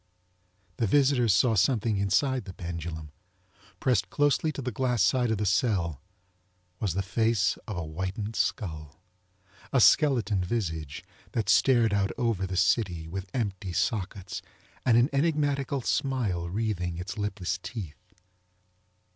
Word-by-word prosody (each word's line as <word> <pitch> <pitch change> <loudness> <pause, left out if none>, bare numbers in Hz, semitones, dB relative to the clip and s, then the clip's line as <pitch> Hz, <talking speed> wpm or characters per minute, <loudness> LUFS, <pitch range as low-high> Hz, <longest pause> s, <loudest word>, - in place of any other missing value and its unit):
The 115 - +1
visitors 130 -1 +3
saw 110 +6 +4
something 110 +1 +2
inside 125 +7 +1
the 95 -3 -9
pendulum. 85 -3 -6 0.7
Pressed 105 -8 +1
closely 145 - +2
to 140 - -5
the 125 - -2
glass 125 -2 +1
side 125 +5 +2
of 110 - +1
the 105 - -1
cell 95 - +1 0.8
was 100 -6 -1
the 100 - 0
face 105 -1 +1
of 105 -5 -4
a 85 - -2
whitened 95 +7 -4
skull—a 90 - -4
skeleton 120 - +4
visage 80 -8 -3 0.3
that 110 -4 -1
stared 115 -1 +4
out 100 -1 +1
over 110 -6 0
the 95 0 -4
city 90 -7 +1
with 95 +3 -6
empty 100 -6 -2
sockets 95 -1 -2 0.5
and 115 -2 +5
an 120 +2 +5
enigmatical 140 -2 +1
smile 110 -11 -1
wreathing 90 -4 -2
its 90 +4 -6
lipless 95 -3 -2
teeth. 90 -5 -8
100 Hz, 130 wpm, -28 LUFS, 90-120 Hz, 0.8 s, and